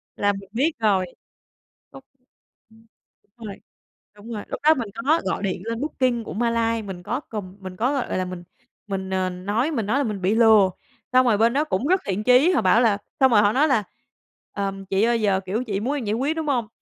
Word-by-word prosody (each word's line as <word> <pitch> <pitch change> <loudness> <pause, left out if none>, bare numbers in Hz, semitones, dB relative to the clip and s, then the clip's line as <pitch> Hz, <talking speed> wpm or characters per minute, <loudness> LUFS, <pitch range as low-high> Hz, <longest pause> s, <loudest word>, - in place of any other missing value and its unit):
Là 205 0 +1
mình 195 -1 -10
biết 285 +8 +1
rồi. 200 -4 +2 0.9
Đúng, 270 - -12 0.7
ừm, 225 0 -21 0.5
rồi, 215 -4 -8 0.6
đúng 210 +3 -11
rồi, 210 - -5
lúc - - -6
đó 310 +1 +6
mình 235 -7 -4 0.2
có 315 +3 +3
gọi 190 +2 -2
điện 185 -2 -2
lên 230 +1 -3
Booking 255 -5 -1
của - - -7
Malay, 230 0 0
mình 185 -3 -8
có 240 +8 -2
cầm 200 -4 -6
mình 185 -1 -8
có 250 +7 +1
gọi 265 -4 -2
gọi - - -2
là 185 - -1
mình 180 -1 -7 0.4
mình, 190 -2 -4
ờ, 185 -1 0
nói 205 - -1
mình 230 -9 -2
nói 235 +6 +1
là 285 - +1
mình 210 -6 -4
bị 190 +4 +1
lừa, 220 -4 +6 0.4
xong 255 0 +5
rồi 225 -4 +3
bên 230 +2 +3
đó 290 +3 +2
cũng 255 -2 -1
rất 370 +3 +2
thiện 200 +2 -2
chí, 250 +7 +5
họ 350 - +2
bảo 230 - +4
là 220 -4 +3 0.2
xong 265 -1 +5
rồi 210 -3 +6
họ 205 0 +3
nói 290 +4 +3
là 230 -8 +2 0.7
"Ờm, 195 -1 -4
chị 195 +2 0
ơi 235 0 +2
giờ, 200 -3 +2
kiểu, 215 +6 -2
chị 200 -5 -3
muốn 255 +7 -2
em 270 -5 -4
giải 205 - -1
quyết 275 +7 -1
đúng 315 -2 -3
hông? 245 -6 0
225 Hz, 230 wpm, -23 LUFS, 195-250 Hz, 0.9 s, đó